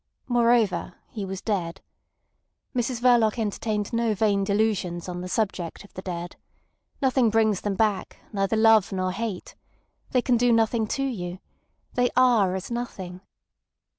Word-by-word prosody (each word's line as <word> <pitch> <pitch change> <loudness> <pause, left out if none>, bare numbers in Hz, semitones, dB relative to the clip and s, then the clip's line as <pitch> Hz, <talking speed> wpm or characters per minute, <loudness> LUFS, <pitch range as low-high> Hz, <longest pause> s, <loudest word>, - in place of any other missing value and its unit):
Moreover, 230 -8 +2 0.2
he 210 -4 -4
was 190 0 -5
dead. 190 -4 -2 1.0
Mrs 245 0 -1
Verloc 240 -3 +4
entertained 210 -1 -2
no 230 -2 +1
vain 200 -1 +2
delusions 200 -4 0
on 180 -1 -5
the 180 - -6
subject 190 -5 -2
of 200 - -18
the 185 - -7
dead. 175 -2 -6 0.7
Nothing 260 -3 +3
brings 220 -3 +2
them 205 -1 -2
back, 210 -2 0 0.2
neither 195 +2 0
love 220 -2 +5
nor 185 -1 -1
hate. 200 -1 -5 0.6
They 250 -2 +1
can 245 -2 +3
do 245 +1 +3
nothing 225 -1 +2
to 275 - -1
you. 185 -9 -3 0.6
They 245 0 +2
are 230 -8 +4
as 190 +5 -5
nothing. 190 -7 -5
215 Hz, 145 wpm, -25 LUFS, 190-235 Hz, 1.0 s, love